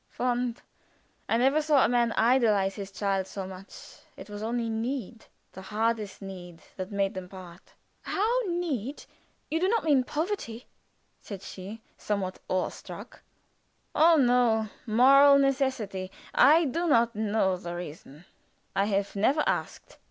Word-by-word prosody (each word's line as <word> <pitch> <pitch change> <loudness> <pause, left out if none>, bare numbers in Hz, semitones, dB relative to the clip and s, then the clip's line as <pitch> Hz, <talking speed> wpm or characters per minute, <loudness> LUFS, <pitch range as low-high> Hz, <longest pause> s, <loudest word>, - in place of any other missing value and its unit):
"Fond! 245 -1 -2 0.7
I 225 - +3
never 270 +5 +3
saw 300 -3 +4
a - - +3
man 240 0 +2
idolize 220 -5 +3
his 195 -1 -7
child 195 -1 -1
so 190 0 -6
much. 190 +1 -11 0.2
It 205 +2 -11
was 205 0 -6
only 230 +1 -2
need 225 0 -4 0.3
the 190 - -10
hardest 215 0 -2
need 180 -3 -10
that 190 +2 -6
made 200 -1 0
them 185 -1 -7
part." 185 -2 -13 0.3
"How 450 +5 0
need? 300 - -3 0.5
You 320 - +1
do 370 - +2
not 455 +3 +1
mean 285 -5 +3
poverty?" 295 - -4 0.6
said 200 -2 -8
she, 205 +4 -9 0.2
somewhat 195 -3 -3
awe 185 -1 0
struck. - - -11 0.7
"Oh, 325 +2 +6
no! 240 -5 +3 0.2
Moral 275 +5 +7
necessity. 260 -9 0 0.2
I 315 +5 +6
do 335 +6 -1
not 235 -5 +3
know 210 -3 +1
the 175 -1 -6
reason. 155 -2 -9 0.5
I 195 0 +2
have 200 -1 -1
never 270 +10 +2
asked. - - -3
225 Hz, 145 wpm, -28 LUFS, 195-270 Hz, 0.7 s, Moral